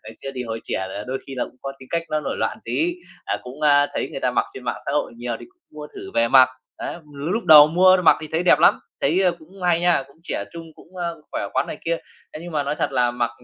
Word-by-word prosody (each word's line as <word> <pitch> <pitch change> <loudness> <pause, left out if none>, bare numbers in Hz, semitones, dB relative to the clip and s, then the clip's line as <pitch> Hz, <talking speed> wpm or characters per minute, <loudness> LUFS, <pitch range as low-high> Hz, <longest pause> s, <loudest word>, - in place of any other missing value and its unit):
Ngày 110 +1 -10
xưa 135 - -4
thì 125 - -3
hồi 115 -1 -5
trẻ 95 - -2
là 100 +2 -6
đôi 130 +1 -3
khi 135 - -7
là 125 - -1
cũng - - -14
có 135 - -4
tính 130 - -14
cách 170 0 0
nó 155 - 0
nổi 140 - -3
loạn - - -2
tí, 345 +2 0 0.3
à, - - -1
cũng, 130 +4 -10
a, 145 -1 +5
thấy - - -2
người - - -6
ta 125 - +1
mặc 125 - +1
trên 130 - -9
mạng 120 - -2
xã 140 - -1
hội 145 -4 -1
nhiều 120 0 -4
thì - - -10
cũng 365 -2 -50
mua 150 -1 -9
thử - - -8
về 115 0 +3
mặc. 130 +1 +7 0.3
Đấy, - - -4 0.2
l 140 - -8
lúc 225 +4 -1
đầu 155 -3 +10
mua 185 +3 +6
mặc - - +7
thì 155 - -7
thấy 160 +2 +1
đẹp 180 - +5
lắm, - - +5 0.2
thấy, 165 +7 +2
ơ, 180 -2 +3
cũng 180 +4 -15
hay 175 -1 +3
nha, 175 -5 +3
cũng 140 - -22
trẻ - - -2
trung 165 -1 -8
cũng, 185 - -18
ơ, 170 -3 -4
khỏe - - -3
khoắn - - +1
này - - -6
kia. 170 0 0 0.4
Thế 155 - -8
nhưng 175 0 -8
mà 150 -2 0
nói 145 +1 -2
thật - - -1
là 120 -1 +2
mặc 120 0 -1
150 Hz, 295 wpm, -22 LUFS, 130-170 Hz, 0.4 s, đầu